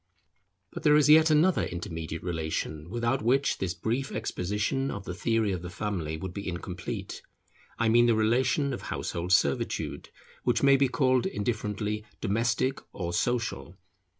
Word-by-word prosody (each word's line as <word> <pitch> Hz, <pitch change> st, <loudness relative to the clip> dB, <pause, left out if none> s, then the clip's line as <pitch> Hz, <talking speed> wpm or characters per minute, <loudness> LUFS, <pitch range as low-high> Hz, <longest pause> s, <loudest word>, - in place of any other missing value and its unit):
But -, -, -6 dB
there 150 Hz, -1 st, +5 dB
is 150 Hz, -1 st, +4 dB
yet 160 Hz, +1 st, +7 dB
another 155 Hz, +4 st, +4 dB
intermediate 80 Hz, -2 st, -5 dB
relation, 80 Hz, -2 st, -3 dB
without 120 Hz, +4 st, 0 dB
which 130 Hz, +5 st, +2 dB
this 90 Hz, -2 st, -2 dB
brief 125 Hz, +5 st, -2 dB
exposition 105 Hz, +5 st, -1 dB
of 100 Hz, -5 st, -5 dB
the 90 Hz, -, -4 dB
theory 110 Hz, +2 st, +1 dB
of 90 Hz, -3 st, -3 dB
the 90 Hz, -, -6 dB
family 90 Hz, -5 st, -3 dB
would 90 Hz, +2 st, -6 dB
be 100 Hz, +1 st, -6 dB
incomplete; 90 Hz, 0 st, -5 dB, 0.6 s
I 115 Hz, -, +1 dB
mean 120 Hz, +2 st, +5 dB
the 115 Hz, -, +4 dB
relation 130 Hz, +6 st, +2 dB
of -, -, -5 dB
household 85 Hz, +1 st, -4 dB
servitude, 70 Hz, -8 st, +1 dB, 0.3 s
which -, -, +1 dB
may 140 Hz, 0 st, +7 dB
be 135 Hz, 0 st, +3 dB
called 130 Hz, -2 st, +2 dB
indifferently 105 Hz, 0 st, -2 dB, 0.2 s
domestic 115 Hz, +5 st, 0 dB
or 85 Hz, -2 st, -4 dB
social. 115 Hz, -3 st, -1 dB
110 Hz, 150 wpm, -28 LUFS, 90-130 Hz, 0.6 s, yet